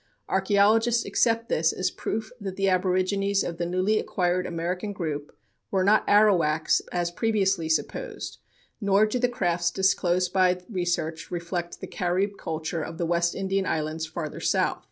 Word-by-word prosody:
Archeologists 210 Hz, +5 st, +3 dB
accept 230 Hz, -1 st, +1 dB
this 160 Hz, -7 st, +2 dB
as 185 Hz, -, -1 dB
proof 220 Hz, 0 st, -4 dB
that 195 Hz, -2 st, -5 dB
the 195 Hz, 0 st, 0 dB
aborigines 190 Hz, +2 st, +1 dB
of 170 Hz, -, -4 dB
the 170 Hz, -, -1 dB
newly 185 Hz, +5 st, +1 dB
acquired 180 Hz, 0 st, 0 dB
American 180 Hz, +4 st, -3 dB
group 150 Hz, -6 st, -5 dB, 0.3 s
were 190 Hz, -1 st, +1 dB
not 210 Hz, +3 st, +4 dB
Arawaks, 180 Hz, -7 st, +4 dB
as 175 Hz, -1 st, -1 dB
previously 195 Hz, -5 st, 0 dB
supposed; -, -, -3 dB, 0.4 s
nor 200 Hz, +1 st, +4 dB
do 215 Hz, +4 st, -1 dB
the 245 Hz, 0 st, +2 dB
crafts 175 Hz, -6 st, 0 dB
disclosed 180 Hz, -1 st, +1 dB
by 185 Hz, -1 st, +3 dB
research 175 Hz, -5 st, -2 dB
reflect 175 Hz, 0 st, -4 dB
the -, -, -5 dB
Carib 185 Hz, +3 st, 0 dB
culture 160 Hz, +1 st, -3 dB
of 160 Hz, +2 st, -6 dB
the 170 Hz, -, -1 dB
West 170 Hz, 0 st, +1 dB
Indian 195 Hz, 0 st, -1 dB
islands 160 Hz, +1 st, -2 dB
farther 155 Hz, -1 st, -5 dB
south. -, -, +1 dB
185 Hz, 155 wpm, -26 LUFS, 170-200 Hz, 0.4 s, not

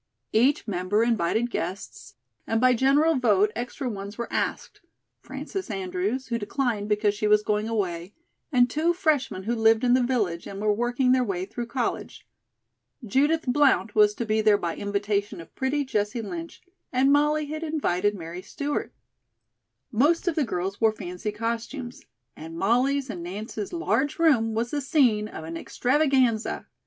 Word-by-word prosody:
Each 250 Hz, +6 st, +3 dB
member 195 Hz, +2 st, +1 dB
invited 230 Hz, +1 st, +1 dB
guests, 180 Hz, -9 st, -5 dB, 0.3 s
and 225 Hz, -, +1 dB
by 255 Hz, +1 st, +5 dB
general 280 Hz, +5 st, +3 dB
vote 210 Hz, -4 st, +3 dB
extra 250 Hz, +3 st, -4 dB
ones 200 Hz, -2 st, -6 dB
were 235 Hz, -, -5 dB
asked: -, -, -3 dB, 0.4 s
Frances 380 Hz, -7 st, -6 dB
Andrews, 195 Hz, +6 st, -3 dB
who 235 Hz, -1 st, -1 dB
declined 215 Hz, -1 st, -2 dB
because 210 Hz, 0 st, +2 dB
she 210 Hz, +1 st, -1 dB
was 210 Hz, 0 st, +4 dB
going 210 Hz, +1 st, 0 dB
away, 185 Hz, -4 st, -3 dB, 0.4 s
and 245 Hz, -3 st, +5 dB
two 315 Hz, +7 st, +1 dB
freshmen 285 Hz, -, 0 dB
who 230 Hz, +4 st, -1 dB
lived 225 Hz, 0 st, +3 dB
in 245 Hz, -1 st, +4 dB
the 255 Hz, -, +4 dB
village, 215 Hz, -9 st, -1 dB
and 195 Hz, -, -7 dB
were 210 Hz, 0 st, +2 dB
working 245 Hz, +3 st, +1 dB
their 255 Hz, 0 st, +4 dB
way 190 Hz, -5 st, -2 dB
through 235 Hz, +4 st, -6 dB
college. 245 Hz, 0 st, -3 dB, 0.8 s
Judith 290 Hz, +9 st, +2 dB
Blount 260 Hz, -4 st, +3 dB
was 210 Hz, -1 st, +4 dB
to 235 Hz, -, -3 dB
be 220 Hz, 0 st, +1 dB
there 215 Hz, -1 st, +5 dB
by 170 Hz, -4 st, -3 dB
invitation 205 Hz, -1 st, -2 dB
of 165 Hz, -, -12 dB
pretty 280 Hz, +2 st, -1 dB
Jessie 215 Hz, -1 st, -1 dB
Lynch, 335 Hz, +9 st, -7 dB, 0.3 s
and 265 Hz, +2 st, +3 dB
Molly 300 Hz, +1 st, +3 dB
had 310 Hz, +2 st, -5 dB
invited 205 Hz, -, 0 dB
Mary 170 Hz, 0 st, -7 dB
Stewart. 285 Hz, +8 st, -4 dB, 1.0 s
Most 295 Hz, -, +2 dB
of 350 Hz, -, +2 dB
the 310 Hz, -, +1 dB
girls 195 Hz, -3 st, -3 dB
wore 220 Hz, -1 st, +4 dB
fancy 180 Hz, +1 st, -5 dB
costumes, 235 Hz, +4 st, -5 dB, 0.3 s
and 165 Hz, +1 st, -9 dB
Molly's 255 Hz, +6 st, +1 dB
and 180 Hz, -, -7 dB
Nance's 205 Hz, +4 st, -6 dB
large 295 Hz, -5 st, 0 dB
room 245 Hz, -10 st, +3 dB
was 235 Hz, +2 st, -1 dB
the 295 Hz, -, -1 dB
scene 250 Hz, -8 st, +2 dB
of 160 Hz, -, -8 dB
an 165 Hz, +1 st, -6 dB
extravaganza. 255 Hz, -, +1 dB
230 Hz, 165 wpm, -25 LUFS, 205-265 Hz, 1.0 s, by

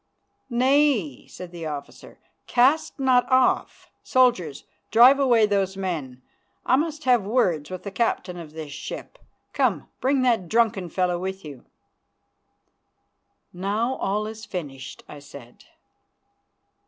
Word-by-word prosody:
"Nay," 255 Hz, -, +1 dB
said 180 Hz, -1 st, -10 dB
the 170 Hz, -2 st, -6 dB
officer, 145 Hz, -2 st, -8 dB, 0.3 s
"cast 275 Hz, +5 st, +2 dB
not 260 Hz, -1 st, +2 dB
off. 255 Hz, 0 st, +1 dB
Soldiers, 190 Hz, -, +1 dB, 0.3 s
drive 250 Hz, +5 st, +7 dB
away 240 Hz, -5 st, +4 dB
those 195 Hz, -2 st, -1 dB
men. 150 Hz, -10 st, -5 dB, 0.4 s
I -, -, +4 dB
must 310 Hz, +2 st, -2 dB
have 250 Hz, -3 st, +4 dB
words 185 Hz, -, 0 dB
with 185 Hz, -1 st, -7 dB
the 200 Hz, -, -6 dB
captain 190 Hz, -4 st, -1 dB
of 155 Hz, -3 st, -10 dB
this 155 Hz, -2 st, -8 dB
ship. 150 Hz, -, -8 dB, 0.3 s
Come, -, -, 0 dB
bring 265 Hz, 0 st, +1 dB
that 225 Hz, -9 st, +1 dB
drunken 215 Hz, -6 st, +1 dB
fellow 180 Hz, 0 st, 0 dB
with 190 Hz, 0 st, -5 dB
you." 140 Hz, -5 st, -11 dB, 1.9 s
"Now 205 Hz, +7 st, -1 dB
all 210 Hz, +2 st, -1 dB
is 220 Hz, 0 st, -8 dB
finished," 145 Hz, -, -7 dB
I 150 Hz, -, -10 dB
said. 140 Hz, -4 st, -14 dB
195 Hz, 125 wpm, -24 LUFS, 165-250 Hz, 1.9 s, drive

